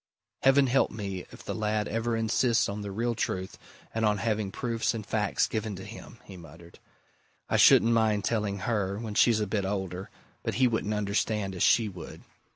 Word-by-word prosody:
"Heaven 135 +1 +5
help 135 +1 +2
me 100 -4 -6
if - - -12
the - - -3
lad 105 -1 -1
ever 115 +1 -1
insists 115 +1 +2
on 100 +1 -4
the 100 - -5
real 115 +4 -1
truth 95 -4 -3 0.3
and 115 - -1
on 105 -1 +3
having 105 -2 -1
proofs 115 +2 -1
and 110 -2 -5
facts 105 -1 +1
given 110 -2 -3
to 95 - -8
him!" 115 +2 -11
he 95 - -11
muttered. 85 +1 -14 0.7
"I - - +1
shouldn't 115 +1 +6
mind 110 -3 +2
telling 105 -3 -1
her, 100 -2 -1
when 110 -1 -5
she's 110 +1 +4
a - - +1
bit 100 0 -1
older 95 -1 -4 0.3
but - - -3
he 130 0 +4
wouldn't 110 -2 -1
understand 105 -1 -1
as 90 - -6
she 115 -2 +4
would. 90 -5 -9
105 Hz, 190 wpm, -28 LUFS, 100-115 Hz, 0.7 s, shouldn't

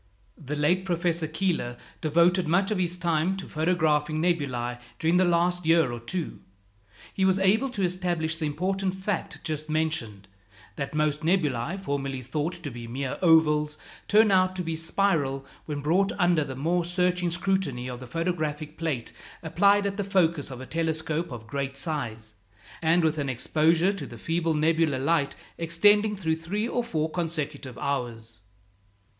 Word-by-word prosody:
The 150 0 -5
late 175 +6 +2
Professor 170 -3 0
Keeler 160 -7 -1 0.2
devoted 170 +3 +3
much 190 +5 +2
of 210 - 0
his 180 -1 0
time 175 +1 +1
to 190 - -7
photographing 155 -2 +1
nebulæ 130 -8 -1 0.2
during 165 +2 +2
the 185 - +4
last 175 +1 +2
year 165 -4 +4
or 120 - -5
two. 160 +9 -4 0.7
He 190 - -1
was 190 0 +4
able 210 +8 +3
to 210 -6 -3
establish 175 -3 0
the 160 -2 -2
important 190 +5 -1
fact 190 -1 -3
just 155 0 -3
mentioned, 155 -11 -2 0.5
that 140 +2 -4
most 150 0 +1
nebulæ 160 -2 0
formerly 135 -6 -3
thought 155 +7 -3
to 145 - -4
be 120 -1 -8
mere 130 +3 -4
ovals, 155 -3 +4 0.3
turn 215 0 +5
out 185 -1 +3
to 180 - -2
be 165 -1 -2
spiral 160 -5 0 0.2
when 145 -2 -3
brought 180 +7 +2
under 175 -4 +3
the 135 -2 -6
more 170 +6 0
searching 180 0 +1
scrutiny 170 -8 -1
of 125 -1 -6
the 130 - -9
photographic 155 0 -3
plate 155 -8 -2 0.3
applied 200 +5 +3
at 200 0 -2
the 205 - 0
focus 170 -7 +1
of 130 -2 -7
a 130 - -7
telescope 160 +1 -1
of 115 -3 -7
great 140 +1 -3
size, 115 -9 -3 0.5
and 165 +1 +3
with 160 -1 +1
an 140 -2 -1
exposure 160 - +2
to 195 - -6
the - - -10
feeble 165 -1 0
nebular 160 -2 +2
light 140 +1 +1 0.2
extending 205 +6 +4
through 160 -5 -1
three 200 +7 -2
or 245 0 -1
four 160 -9 -1
consecutive 155 -6 -4
hours. 115 -5 -4
160 Hz, 160 wpm, -27 LUFS, 145-180 Hz, 0.7 s, turn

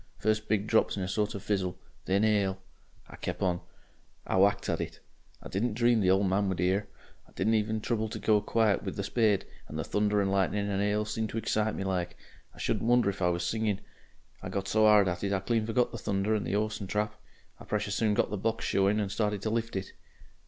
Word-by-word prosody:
First 110 0 0
big 105 -1 +1
drops 110 -1 +2
in 95 - -2
a - - -2
sort 105 +2 -1
of 100 - -6
fizzle, 95 -4 -1 0.3
then 100 +3 +2
'ail. 100 -3 +2 0.5
I - - -12
kep'on. 90 -2 -1 0.6
I - - -1
whacked 100 +2 +3
at - - 0
it - - -6 0.4
I - - -7
didn't 105 +3 -1
dream 120 0 +3
the 95 - +3
old 95 +2 +4
man 95 +1 +1
would 95 - -2
'ear. 95 +3 +1 0.4
I - - -21
didn't 110 +4 +1
even 110 0 +1
trouble 110 -1 -1
to - - -5
go 105 -2 +3
quiet 110 -1 +2
with - - -5
the 100 - -3
spade, 105 -1 +2 0.2
and 75 - -7
the 80 - -1
thunder 105 +3 +1
and 100 -1 +1
lightning 100 +1 +1
and 100 -1 -1
'ail 105 +1 +1
seemed 110 +1 -2
to 115 - -5
excite 110 -1 0
me - - -3
like. 90 -2 -2 0.3
I - - -23
shouldn't 115 - -1
wonder 120 -4 +4
if 95 - -11
I 90 - +3
was 85 0 -1
singing. 110 0 0 0.6
I - - -6
got 95 0 -3
so 110 +2 +4
'ard 105 -2 +6
at 90 +1 -2
it 100 0 0
I 95 - +1
clean 110 +2 0
forgot 120 +2 +1
the 115 - -6
thunder 100 +1 0
and 105 - -1
the - - -1
'orse 105 0 -1
and 100 -3 -6
trap. 105 +1 0 0.5
I - - -11
precious 105 -1 -2
soon 105 -1 +1
got - - +1
the 105 - -1
box 115 +3 -1
showing, 100 +2 +2
and 100 -2 -2
started 105 -2 -1
to 110 - -1
lift 115 -1 -2
it...." 95 0 -4
105 Hz, 235 wpm, -29 LUFS, 95-110 Hz, 0.6 s, ard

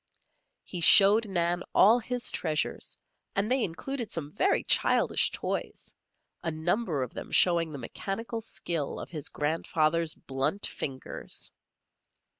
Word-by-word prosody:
He 180 - -6
showed 205 +5 +7
Nan 175 -2 0
all 225 +5 +6
his 245 +1 -2
treasures, 155 -3 -2 0.4
and 200 +4 0
they 260 -2 +2
included 235 +7 -4
some 150 -3 -5
very 380 - +1
childish - - +2
toys, - - -5 0.5
a 170 - -2
number 160 - -1
of 125 - -7
them - - -7
showing 170 -3 +3
the 145 - -6
mechanical 200 - -5
skill 170 -8 -3
of - - -8
his 155 -4 -4
grandfather's 155 +1 0
blunt 135 +9 -2
fingers. 130 -2 -5
170 Hz, 125 wpm, -28 LUFS, 155-215 Hz, 0.5 s, showed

